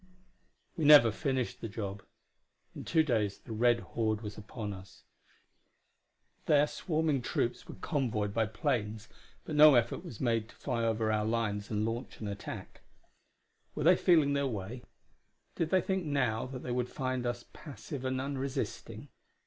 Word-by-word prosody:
We 160 - -2
never 145 -6 +8
finished 125 0 -2
the 115 - -3
job; 100 -2 -5 0.7
in - - -7
two 160 -1 +3
days 110 -8 0
the 120 - -12
red 120 +1 +3
horde 110 -2 -1
was 105 -2 -6
upon 105 0 -6
us. 95 0 -13 1.4
Their 145 -1 +5
swarming 155 -3 -1
troops 120 0 -2
were - - -8
convoyed 110 -9 -1
by 110 -1 +1
planes, 110 0 -2 0.4
but 155 - -5
no 150 -1 +9
effort 120 -1 +1
was 110 - -9
made 115 -3 0
to - - -16
fly 115 -1 -2
over 110 -1 +1
our 105 0 +1
lines 110 -2 -1
and 105 -1 0
launch 115 +3 -4
an 110 - -5
attack. 100 0 -7 0.9
Were - - -2
they - - +7
feeling 155 -5 +4
their 140 -1 +1
way? 110 +1 -5 0.7
Did 165 - -1
they 185 +1 +3
think 190 -1 -1
now 130 -7 0
that 130 -1 -7
they 125 - -4
would 125 0 -1
find 130 -2 -2
us 120 0 -3
passive 145 -2 -8
and 130 0 -1
unresisting? 135 0 -4
120 Hz, 160 wpm, -31 LUFS, 110-140 Hz, 1.4 s, no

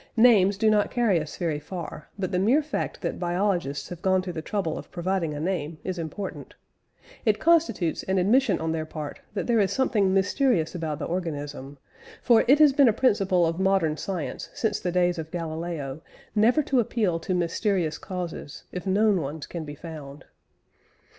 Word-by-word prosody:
Names 205 -5 +6
do 215 +1 +3
not 210 -1 +2
carry 230 -8 +2
us 155 -1 -6
very 165 -4 -1
far; 155 -1 -7
but 190 -2 -2
the 180 - +1
mere 250 +11 +3
fact 305 - -4
that - - -3
biologists 175 -5 -1
have 175 -1 -8
gone 185 -1 +2
to 180 -1 -5
the 160 - -4
trouble 170 -2 -2
of - - -8
providing 175 -3 -2
a - - -4
name, 165 -2 -2
is 185 -2 -3
important. 175 +5 -6 0.7
It 215 -2 +3
constitutes 305 - +2
an 190 0 -1
admission 205 +2 +3
on 160 0 -1
their 160 -1 -2
part 155 -2 -6 0.2
that 200 - -1
there 235 -2 +2
is 195 -2 +2
something 215 -7 +2
mysterious 195 - +2
about 160 -4 -3
the 150 - -4
organism; 145 -5 -4 0.5
for 235 -2 +5
it 275 +4 +7
has 300 -2 +6
been 280 -1 +5
a - - +2
principle 195 -7 +2
of 165 +2 -1
modern 190 -5 +2
science 175 -1 -4
since 220 - 0
the 180 - -2
days 175 -1 +2
of 160 -1 -5
Galileo 160 -4 -4 0.3
never 235 +8 +4
to 265 -2 +1
appeal 210 -7 0
to 180 +3 -2
mysterious 175 -1 0
causes 175 -6 -6
if 180 +2 -6
known 200 -1 +3
ones 145 +2 -5
can 165 -3 -6
be 145 0 -7
found. 150 -3 -9
180 Hz, 185 wpm, -26 LUFS, 160-205 Hz, 0.7 s, it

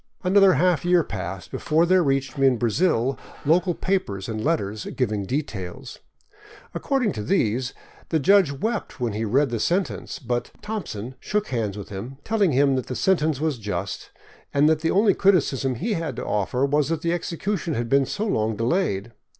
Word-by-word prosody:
Another 195 0 +5
half 175 +4 +2
year 175 -1 +4
passed 95 -6 -6
before 160 +2 +2
there 185 +1 +4
reached 135 -3 0
me 135 -1 +3
in 130 -2 +3
Brazil 125 - +1 0.3
local 175 +3 +3
papers 105 - -2
and 110 -1 -4
letters 110 -10 -1
giving 105 -6 -1
details. 125 -3 -5 0.7
According 265 -7 0
to 105 - -5
these, 125 - 0 0.3
the 160 - +2
judge 185 +1 +4
wept 215 - -3
when 120 -4 -1
he 110 +2 -2
read 130 +5 +2
the 115 - -1
sentence, 155 - -1
but 120 -1 -3
Thompson 130 - -5
" - - -41
shook 210 0 -2
hands 110 -5 -2
with 100 - -8
him, 105 +7 -7
telling 210 -6 +2
him 135 0 +3
the 125 0 -4
sentence 160 -6 +1
was 155 -5 -1
just, 100 -2 -4 0.4
and 145 +1 +4
that 155 -1 +3
the 165 +1 0
only 205 +4 +4
criticism 140 -9 +2
he 215 - -2
had 165 - -3
to - - -5
offer 105 +6 0
was 145 +1 +1
that 165 -1 -2
the 170 0 +1
execution 175 -1 -2
had 120 0 -2
been 135 +2 +3
so 210 - -2
long 110 - 0
delayed. 115 - 0
140 Hz, 180 wpm, -24 LUFS, 115-175 Hz, 0.7 s, Another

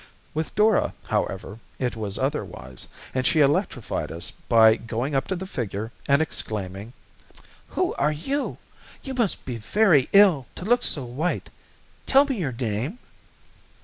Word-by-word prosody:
With 155 0 -3
Dora, 215 -1 +3
however, 105 +3 -2 0.2
it 125 -2 -1
was 105 -3 -3
otherwise, 130 - -3 0.3
and 130 - 0
she 155 - +3
electrified 140 - +1
us 85 +2 -3
by 110 -2 +5
going 115 +5 -3
up 135 - 0
to 190 - -1
the 185 +1 -5
figure, 110 - -4 0.2
and 140 +2 +4
exclaiming: 105 -5 -5 0.7
"Who - - -1
are 150 +2 +3
you? 270 - -2 0.5
You 270 - -5
must 235 -7 0
feel 120 -3 -5
very 160 - +3
ill 190 - +6
to 180 - -7
look 245 +3 +3
so 140 - +1
white. 140 +9 -2 0.6
Tell 275 +1 +6
me 270 -6 -2
your 145 -7 -1
name." 120 - -3
135 Hz, 145 wpm, -25 LUFS, 110-185 Hz, 0.7 s, ill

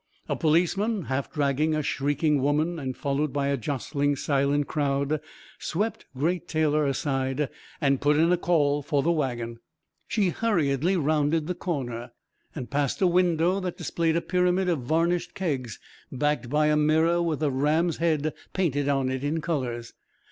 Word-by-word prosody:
A - - 0
policeman, 180 +6 +1
half 135 0 -3
dragging 150 +1 +1
a 155 - -1
shrieking 145 +1 +1
woman 155 +5 +1
and 130 -3 -4
followed 140 +1 -1
by 140 0 0
a 140 - +2
jostling, 140 +2 -1
silent 140 +1 +1
crowd, 140 0 0 0.4
swept 210 +7 -2
Great 170 +5 0
Taylor 155 -2 +1
aside 135 0 -1 0.3
and 140 -3 +2
put 145 +1 +3
in 165 +2 +4
a 180 - +4
call 145 -5 +2
for 145 -1 0
the 170 - +2
wagon. 120 -7 -2 0.5
She 205 -5 +1
hurriedly 175 - +1
rounded 155 0 +1
the 180 - -2
corner 125 -9 -4 0.4
and 130 -6 -6
passed 140 -2 0
a 190 - +3
window 175 0 +3
that 180 -2 -4
displayed 165 -1 0
a 170 - +2
pyramid 180 +1 +1
of 165 -4 +1
varnished 165 +7 0
kegs 135 - -2 0.3
backed 145 -1 -1
by 150 +2 +2
a 150 0 +3
mirror 160 +3 +3
with 160 -3 -1
a 145 - +2
ram's 155 +5 +1
head 155 -2 +1 0.2
painted 145 -6 0
on 135 -2 +1
it 130 +1 -3
in 150 +3 0
colours. 130 -8 -3
150 Hz, 160 wpm, -26 LUFS, 140-170 Hz, 0.5 s, in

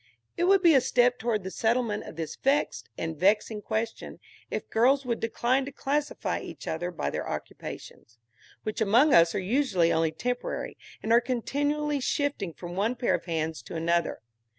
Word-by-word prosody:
It 345 - +1
would 385 0 +4
be 335 -2 +7
a 265 - +6
step 245 -1 +3
towards 220 -4 -1
the 190 - -5
settlement 225 -1 0
of - - -9
this 160 -1 -5
vexed 280 +2 0
and 160 0 -3
vexing 210 +5 +2
question 220 +2 -3 0.3
if - - -4
girls 265 +4 +3
would 235 -2 -1
decline 240 +4 +1
to 280 - -6
classify 290 +2 -2
each - - -9
other 175 +2 -2
by 115 - -3
their - - -4
occupations, 115 +1 -8 0.5
which 215 +1 -3
among 235 +8 +5
us 170 0 +6
are - - +1
usually 190 -4 +2
only 160 -1 +2
temporary, 245 +9 -3 0.3
and 225 - +2
are 235 - +6
continually 290 +4 -1
shifting 280 - -1
from 175 +2 -8
one 215 +6 0
pair 240 0 +1
of - - -2
hands 160 -2 -2
to 175 - -9
another. 170 +1 0
225 Hz, 175 wpm, -28 LUFS, 175-265 Hz, 0.5 s, be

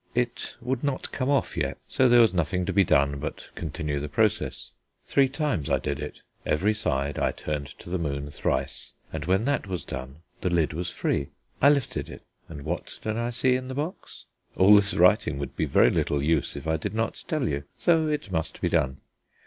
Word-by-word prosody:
It 120 0 -1
would 125 +2 -2
not 140 -2 -2
come 130 0 -1
off 140 -1 +1
yet, 70 -5 -1
so 130 -1 +3
there 120 0 +7
was 115 -4 +4
nothing 90 +1 0
to 95 - -1
be 100 +1 +5
done 70 -4 +2
but - - -6
continue 75 -2 -3
the 75 +1 -4
process. 70 - 0 0.3
Three 135 -1 +3
times 140 - -1
I - - +3
did 70 0 -3
it: 75 - -7 0.2
every 95 +8 +2
side 70 -10 -1
I - - +2
turned 75 -2 -4
to - - -14
the 90 +1 -2
moon 70 -2 -3
thrice, 65 -1 -2 0.2
and 75 -2 -4
when 95 +5 +2
that 140 -6 0
was 90 -3 -4
done 65 +4 -7 0.2
the 90 - 0
lid 85 -3 +1
was 85 +3 -3
free. 70 - -1 0.3
I 140 - +8
lifted 140 -4 0
it, - - -10 0.3
and 75 -3 -8
what - - -4
did 110 0 -1
I 120 +1 -1
see 125 +1 +2
in 130 0 -3
the 130 - -5
box? 155 +6 -5 0.3
All 95 +3 +7
this 100 -1 +3
writing - - +4
would 70 -2 -5
be - - 0
very - - +4
little 70 - +1
use 80 +2 +1
if - - -7
I 80 0 +2
did 80 - -4
not 115 0 -2
tell 150 -6 0
you, 70 0 -2
so 165 -2 +3
it 150 -9 -2
must 80 -2 -2
be - - 0
done. 65 0 +1
90 Hz, 215 wpm, -26 LUFS, -, 0.3 s, I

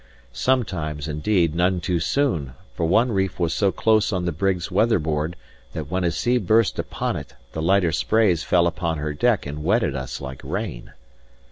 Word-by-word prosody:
Sometimes, 80 - -1
indeed, 85 +2 +1
none 90 +2 +1
too 90 0 -1
soon; 85 - 0 0.2
for 80 +5 -1
one 115 +8 +3
reef 95 -3 -1
was 85 -2 +1
so 100 +2 +2
close 110 0 +2
on 90 -3 -1
the 85 - 0
brig's 90 +2 -1
weather 115 0 +3
board 80 +1 -2 0.4
that - - -6
when 90 0 0
a 85 - +2
sea 120 +10 +1
burst 110 +1 +2
upon - - -2
it - - -8 0.2
the 80 - -4
lighter 90 0 +3
sprays 105 -6 +2
fell 85 -1 +3
upon 85 -1 -1
her 75 0 -3
deck 115 +8 +1
and 75 +1 -6
wetted 100 - +1
us 65 -1 -5
like 65 -1 -7
rain. - - -5
90 Hz, 180 wpm, -23 LUFS, 80-100 Hz, 0.4 s, one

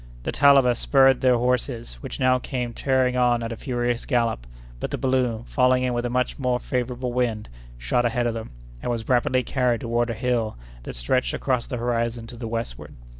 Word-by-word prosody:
The - - -2
Talabas 135 -4 +5
spurred 135 -2 +4
their 125 -2 +4
horses, 120 - -1
which - - -6
now 130 0 +3
came 125 -1 -4
tearing 130 0 +1
on 120 -1 +2
at 115 - -4
a - - -3
furious 120 -1 -2
gallop; 115 - 0 0.3
but - - -3
the - - -3
balloon, 125 -4 0
falling 125 0 +2
in 125 -1 0
with 120 0 -1
a - - -4
much 125 +3 -1
more 125 -2 +1
favorable 125 0 -3
wind, 115 -4 -1 0.3
shot - - 0
ahead 120 0 0
of 120 - 0
them, 115 0 -6 0.3
and - - -3
was 115 -2 -3
rapidly 125 0 +2
carried 125 -2 0
toward 120 0 0
a 115 - -2
hill 115 - -1 0.2
that - - -7
stretched 125 - 0
across 125 -3 -1
the 125 - -4
horizon 115 -1 -1
to 115 - -10
the 115 -1 -6
westward. 110 - -5
120 Hz, 200 wpm, -24 LUFS, 115-125 Hz, 0.3 s, Talabas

